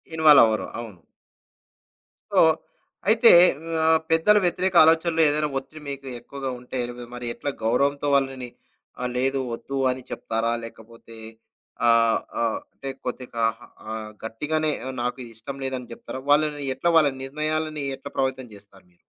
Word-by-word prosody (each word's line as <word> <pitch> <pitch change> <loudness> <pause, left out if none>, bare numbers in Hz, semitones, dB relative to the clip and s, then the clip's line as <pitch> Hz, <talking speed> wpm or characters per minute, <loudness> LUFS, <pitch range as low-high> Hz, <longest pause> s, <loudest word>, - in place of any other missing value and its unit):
ఇన్వాల్వవ్వరు, 135 -10 +5
అవును. 105 -7 -9 1.3
సో - - +6 0.7
అయితే 230 +1 +7 0.5
ఆహ్, 160 0 +5
పెద్దల 165 +6 +5
వ్యతిరేక 180 +1 0
ఆలోచనలో 165 +1 +3
ఏదైనా 150 +1 0
ఒత్తిడి 140 +3 -8
మీకు 140 -1 -7
ఎక్కువగా 135 +1 -6
ఉంటే 125 +1 -6
రి - - -6 0.2
మరి 125 0 -6
ఎట్లా 145 - -4
గౌరవంతో 140 +5 +1
వాళ్ళని 135 -2 -1 0.5
ఆహ్, 125 - -1
లేదు 135 +2 +1
వద్దు 135 +4 -5
అని 130 +1 -5
చెప్తారా? 115 +1 -2
లేకపోతే, 115 0 -12 0.7
ఆహ్, 115 -1 +4 0.2
ఆహ్, 115 -1 0
అంటే 135 - -7 0.2
కొద్దిగా 125 -2 -4 0.5
ఆహ్, 110 -1 -6 0.2
గట్టిగానే 150 +7 -1 0.3
నాకిది 125 0 -4
ఇష్టం 135 +5 -8
లేదని 130 -2 -5
చెప్తారా? 130 +2 -8
వాళ్ళని 150 -1 +2
ఎట్లా 170 +6 +1
వాళ్ళ 150 -3 +4
నిర్ణయాలని 155 +1 -2
ఎట్లా 135 - -10
ప్రభావితం 130 -1 -1
చేస్తారు 100 -2 -19
మీరు? 90 - -32
135 Hz, 130 wpm, -24 LUFS, 115-150 Hz, 1.3 s, అయితే